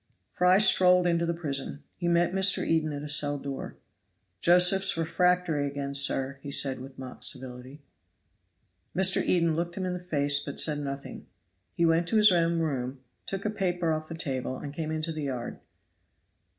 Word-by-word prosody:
Fry 180 +1 +4
strolled 180 -3 +5
into 170 -1 +1
the 170 - 0
prison. 145 -3 -4
He 175 - -4
met 170 +1 +2
Mr. 190 +1 +2
Eden 160 -1 +1
at 145 0 -6
a - - -5
cell 145 0 +1
door. 140 -1 -7 0.6
"Josephs 180 - +3
refractory 165 -2 +1
again, 140 0 -5
sir," 140 -1 0
said 135 -1 +1
he, - - -10
with 135 0 -11
mock 130 -1 -9
civility. 130 +2 -6 1.1
Mr. 190 0 +3
Eden 170 -3 +2
looked 170 +2 -3
him 190 - -2
in 180 - -2
the 180 - -4
face, 145 -5 +2
but 140 - -4
said 150 -2 +3
nothing. 140 -1 -7 0.5
He 170 - +2
went 165 +1 +2
to 220 - +2
his 210 -1 +7
own 170 -1 +2
room, 130 -4 -3 0.3
took 195 +1 -5
a 210 - 0
paper 175 -5 -1
off 155 0 -3
the 165 - -6
table, 130 -4 -4
and 145 +1 -8
came 155 0 -4
into 155 +1 -3
the 155 -2 -4
yard. 125 -3 -5
160 Hz, 175 wpm, -27 LUFS, 140-180 Hz, 1.1 s, his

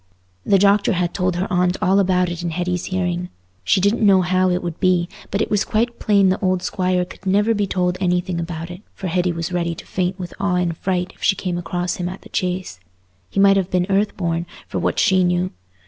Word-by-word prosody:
The 200 - +4
doctor 200 +2 +3
had 175 -1 -1
told 180 -2 0
her 180 +2 -1
aunt 180 +1 +2
all 195 +2 +3
about 180 -2 +2
it 175 0 -5
in 175 - -2
Hetty's 180 +1 -2
hearing. 180 -1 -2 0.3
She 195 - +3
didn't 205 +5 +2
know 195 -3 +5
how 185 +1 +2
it 180 0 0
would 170 -2 -5
be, 180 -2 +2 0.2
but 205 +2 0
it - - -6
was 210 -2 +2
quite 235 +2 -1
plain 200 -3 +3
the 185 - 0
old 185 -1 +1
Squire 180 -1 0
could 190 - -12
never 205 +4 +3
be 205 -2 0
told 180 -1 -1
anything 180 -1 0
about 165 0 -5
it, 175 - -9
for 195 - -7
Hetty 180 0 +1
was 165 +1 -4
ready 170 -1 -1
to - - -11
faint 185 0 -2
with 180 -2 -7
awe 195 -2 +1
and 175 -2 0
fright 180 +1 -2
if - - -26
she 195 - +3
came 180 -2 -3
across 175 +1 -2
him 175 0 -2
at 185 - -8
the - - -14
Chase. 180 - -3 0.5
He - - -2
might 195 0 +6
have 190 -1 0
been 180 -1 +1
earth 205 +2 +1
born, 170 -2 -1 0.2
for - - -3
what - - -1
she 190 -1 +4
knew. 180 +1 +1
180 Hz, 235 wpm, -20 LUFS, 175-195 Hz, 0.5 s, might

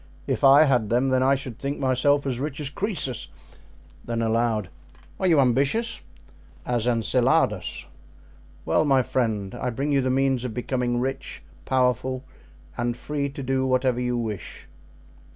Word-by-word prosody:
If - - -2
I 140 +2 +8
had 125 -8 +2
them 130 +3 +2
I 130 +1 +3
should 130 -4 -7
think 140 +1 -3
myself 140 +2 +2
as 130 -3 -2
rich 145 +1 -4
as 145 -2 -3
Croesus." 170 - 0 0.8
Then 115 -1 -2
aloud: 110 -3 0 0.5
"Are 190 - +1
you 165 -4 +4
ambitious?" 140 - +1 0.6
"As 120 -1 0
Enceladus." 120 +2 +1 0.8
"Well, - - +2
my 135 -3 +3
friend, 110 -6 -1
I 125 - -3
bring 135 +5 -2
you 140 -1 +3
the 130 - -1
means 135 -1 +1
of 125 -4 -5
becoming 125 -1 -1
rich, 135 +2 -4 0.2
powerful, 130 0 0 0.5
and 120 0 -2
free 145 +1 -3
to 140 0 -7
do 130 0 0
whatever 130 -1 +1
you 125 0 -1
wish." 110 -6 -6
130 Hz, 150 wpm, -24 LUFS, 120-140 Hz, 0.8 s, I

